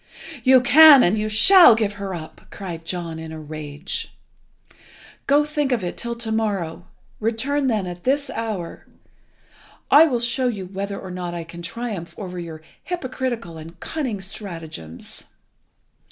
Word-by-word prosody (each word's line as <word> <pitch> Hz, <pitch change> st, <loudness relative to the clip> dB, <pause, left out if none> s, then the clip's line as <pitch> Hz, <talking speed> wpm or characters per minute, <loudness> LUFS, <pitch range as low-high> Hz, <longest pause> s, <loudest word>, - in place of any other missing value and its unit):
"You 260 Hz, 0 st, +6 dB
can, 295 Hz, +1 st, +9 dB
and 180 Hz, -, +3 dB
you 215 Hz, 0 st, -1 dB
shall, 240 Hz, -, +7 dB
give 215 Hz, -2 st, -1 dB
her 195 Hz, -2 st, -3 dB
up!" 155 Hz, -2 st, -9 dB
cried 170 Hz, -4 st, -7 dB
John 170 Hz, -2 st, -4 dB
in 160 Hz, 0 st, -8 dB
a 160 Hz, -, -7 dB
rage. 150 Hz, -1 st, -6 dB, 1.1 s
"Go, 290 Hz, +1 st, +4 dB
think 295 Hz, -2 st, -1 dB
of 235 Hz, -6 st, 0 dB
it 175 Hz, -, -3 dB
till 235 Hz, 0 st, -4 dB
to 230 Hz, -1 st, -5 dB
morrow. 190 Hz, -6 st, -2 dB, 0.3 s
Return 260 Hz, +6 st, 0 dB
then 215 Hz, -6 st, 0 dB
at 175 Hz, -1 st, -7 dB
this 280 Hz, +2 st, 0 dB
hour. 215 Hz, -7 st, -5 dB, 1.0 s
I 305 Hz, +3 st, +9 dB
will 250 Hz, -5 st, 0 dB
show 240 Hz, +2 st, 0 dB
you 205 Hz, -6 st, -3 dB
whether 200 Hz, +2 st, -5 dB
or 185 Hz, -, -8 dB
not 180 Hz, -1 st, -5 dB
I 170 Hz, -, -4 dB
can 170 Hz, +1 st, -10 dB
triumph 200 Hz, -2 st, -5 dB
over 180 Hz, -3 st, -6 dB
your 160 Hz, -2 st, -8 dB, 0.2 s
hypocritical 255 Hz, -, -4 dB
and 165 Hz, +2 st, -12 dB
cunning 255 Hz, -11 st, -4 dB
stratagems." 165 Hz, -, -9 dB
200 Hz, 155 wpm, -22 LUFS, 170-245 Hz, 1.1 s, can